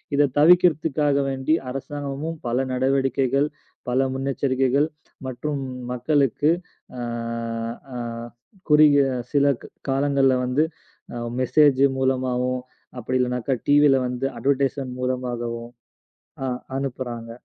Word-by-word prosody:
இதைத் 140 -2 +2
தவிர்க்கறதுக்காக 155 -3 +4
வேண்டி 135 +3 0 0.2
அரசாங்கமும் 145 +3 -5
பல 120 +1 0
நடவடிக்கைகள், 135 +1 +1 0.4
பல 130 +2 +2
முன்னெச்சரிக்கைகள் 135 +1 +1 0.4
மற்றும் 140 +3 -3 0.3
மக்களுக்கு 140 +3 +1 0.5
அ - - -4 0.9
அ, - - -3 0.7
குறுகிய 150 -2 +6 0.3
சிலக் 140 -3 +2 0.2
காலங்கள்ல 135 -1 +3
வந்து, 130 +5 +2 0.5
அ - - -5 0.2
மெசேஜ் 140 +1 +4
மூலமாகவும், 130 -1 0 0.4
அப்டியில்லைனாக்கா 125 +1 0
டீவில 145 -1 +6
வந்து 125 +2 -3
அட்வெர்டைஸ்மென்ட் 135 0 0
மூலமாகவும் 120 -2 -2 0.8
அ, - - 0 0.3
அனுப்புறாங்க. 125 -4 -4
135 Hz, 90 wpm, -23 LUFS, 125-145 Hz, 0.9 s, குறுகிய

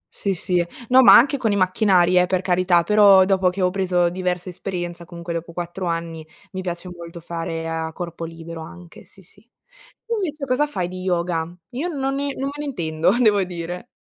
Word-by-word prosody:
Sì, 195 -2 -1
sì, 180 0 +2 0.3
no, 255 +1 +7
ma 255 - +9
anche 280 +4 +3
con 225 -4 0
i 200 - +1
macchinari, 185 -2 +3
eh, 180 - +3
per 185 -1 0
carità, 180 -1 +2
però 200 -1 +6
dopo 190 -1 +2
che 185 +1 -3
ho 180 - +2
preso 180 -2 +1
diversa 180 0 -3
esperienza, 175 -1 -6
comunque 170 0 -7
dopo 170 0 -5
4 175 +1 -5
anni, 165 -1 -4 0.3
mi 185 - -5
piace 175 0 -5
molto 170 0 -10
fare 165 -1 -5
a 160 0 -3
corpo 170 -1 -6
libero 165 0 -8
anche, 175 +1 -12
sì, 190 - -20
sì. 200 +3 -22 0.6
Tu 465 - -3
invece 320 -9 -3
cosa 265 +3 +1
fai 185 -12 -3
di 185 0 -8
yoga? 170 -2 -1 0.2
Io 280 +8 -3
non 275 -5 -2
ne 280 +1 -2
non 265 - -5
me - - -6
ne 295 - -3
intendo, 165 - -1
devo 210 -4 +4
dire. 175 +2 -6
180 Hz, 200 wpm, -22 LUFS, 170-200 Hz, 0.6 s, ma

